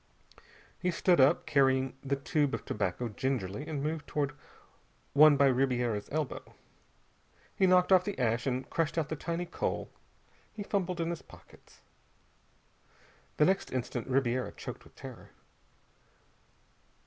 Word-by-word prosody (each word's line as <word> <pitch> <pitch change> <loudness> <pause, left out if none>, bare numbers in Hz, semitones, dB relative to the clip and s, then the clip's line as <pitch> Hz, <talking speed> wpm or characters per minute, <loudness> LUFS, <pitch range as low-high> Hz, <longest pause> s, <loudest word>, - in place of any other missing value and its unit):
He 180 - 0
stood 175 -2 +3
up, 130 - +4
carrying 135 -3 +2
the 140 0 0
tube 140 -1 0
of - - -8
tobacco 100 +3 -2
gingerly, 120 +1 -3
and 145 -3 -3
moved 155 -1 -3
toward 145 -2 -1 0.8
one 150 0 +7
by 140 - +5
Ribiera's 125 -5 +1
elbow. 150 -1 -4 1.0
He 190 - +3
knocked 180 0 +4
off 185 -1 +7
the 205 +1 -4
ash, 120 0 0
and 130 0 -1
crushed 165 -1 -1
out 155 -2 0
the 155 - -2
tiny 170 +3 -3
coal. 175 - -3 0.6
He 210 - -4
fumbled 185 -3 -1
in 165 0 0
his 170 - -5
pockets. - - -18 1.6
The 150 - +5
next 190 +3 +1
instant 125 -1 -3
Ribiera 130 -1 0
choked - - -8
with - - -20
terror. - - -10
140 Hz, 135 wpm, -31 LUFS, 130-165 Hz, 1.6 s, one